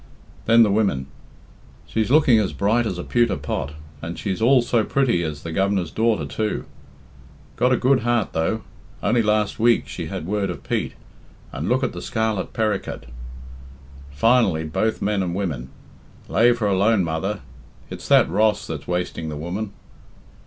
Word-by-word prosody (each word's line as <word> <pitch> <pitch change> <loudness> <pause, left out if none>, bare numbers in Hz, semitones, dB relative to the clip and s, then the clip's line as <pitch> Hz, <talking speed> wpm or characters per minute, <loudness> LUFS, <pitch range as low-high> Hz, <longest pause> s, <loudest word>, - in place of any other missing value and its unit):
Then 115 +1 +7
the 105 - +2
women: 100 -11 +1 0.8
"She's 110 0 -1
looking 135 -5 +5
as 105 - -1
bright 110 +4 +1
as 95 - -3
a 90 - -4
pewter 120 -5 +2
pot, 70 +2 -4 0.3
and 85 +2 -6
she's 100 0 -3
all 125 +1 +5
so 120 -2 +1
pretty 125 -8 +1
as 75 -3 -4
the 85 - -5
Govenar's 95 -1 0
daughter 110 +2 +1
too." 110 -1 -2 0.9
"Got 125 +2 +2
a 125 - +4
good 130 +1 +3
heart, 120 -1 +1
though. 95 +7 -1 0.4
Only 115 +3 +3
last 105 -1 0
week 115 0 +3
she - - -6
had - - -5
word 100 +1 -1
of - - -6
Pete, - - -2 0.6
and 75 - -4
look 130 +2 +2
at 130 - -1
the - - -7
scarlet 110 -3 -1
perricut." 110 -3 -2 1.0
Finally 95 - +2
both 110 +8 -1
men 105 -1 +1
and 90 -2 -2
women: 75 -10 -3 0.6
"Lave 120 +1 +4
her 110 -3 0
alone, 100 +1 +3
mother; 85 +5 -2 0.5
it's - - -7
that - - +5
Ross 105 -1 +1
that's 80 -6 -6
wasting 90 -2 -2
the 75 - -5
woman." 95 +7 -4
105 Hz, 165 wpm, -22 LUFS, 90-115 Hz, 1.0 s, Then